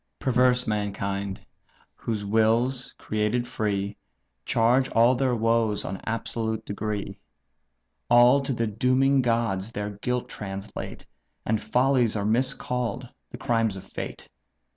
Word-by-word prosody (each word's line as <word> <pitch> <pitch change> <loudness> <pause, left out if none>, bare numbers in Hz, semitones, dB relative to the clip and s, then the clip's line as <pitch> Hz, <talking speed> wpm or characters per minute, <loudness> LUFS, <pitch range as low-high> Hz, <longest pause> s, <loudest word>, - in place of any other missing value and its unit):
"Perverse 125 -1 +2
mankind! 100 -2 -3 0.5
whose 105 -3 -4
wills, 115 +5 +2
created 110 +3 -1
free, 100 -1 -2 0.5
Charge 125 +3 +3
all 115 +2 +5
their 130 -1 +1
woes 115 -2 +1
on 95 0 -5
absolute 110 -1 -2
degree; 100 -1 -4 0.9
All 120 +3 +6
to 135 - -3
the 115 -2 0
dooming 130 +5 +2
gods 115 -4 0
their 105 0 -3
guilt 125 +5 -2
translate, 95 -1 -7 0.4
And 110 -1 0
follies 125 +1 +2
are 100 -1 -1
miscall'd 125 +1 -1 0.2
the - - -8
crimes 115 -3 0
of 95 - -8
fate. - - -7
115 Hz, 120 wpm, -26 LUFS, 105-125 Hz, 0.9 s, All